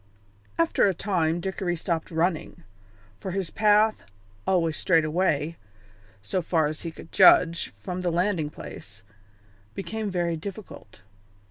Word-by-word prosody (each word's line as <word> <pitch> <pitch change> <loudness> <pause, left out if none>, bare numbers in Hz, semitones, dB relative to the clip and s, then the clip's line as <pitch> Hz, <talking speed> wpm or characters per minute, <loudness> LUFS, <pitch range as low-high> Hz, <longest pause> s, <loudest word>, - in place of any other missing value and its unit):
After 165 +4 +3
a 190 - 0
time 170 -4 0
Dickory 190 -1 -2
stopped 165 -1 -2
running, 170 0 -1 0.6
for 190 - -5
his 185 -2 -3
path, 215 0 +3 0.5
always 165 -4 +2
straight 165 -2 +3
away, 160 -1 0 0.7
so 180 - -1
far 160 -2 +1
as 155 +1 -3
he 170 - -4
could 165 - -13
judge, 170 -3 +6
from 180 -1 -6
the 180 - 0
landing 175 -2 0
place, 100 -7 -11 0.7
became 215 +2 -4
very 175 -2 -1
difficult. 185 - -9
175 Hz, 130 wpm, -26 LUFS, 160-190 Hz, 0.7 s, judge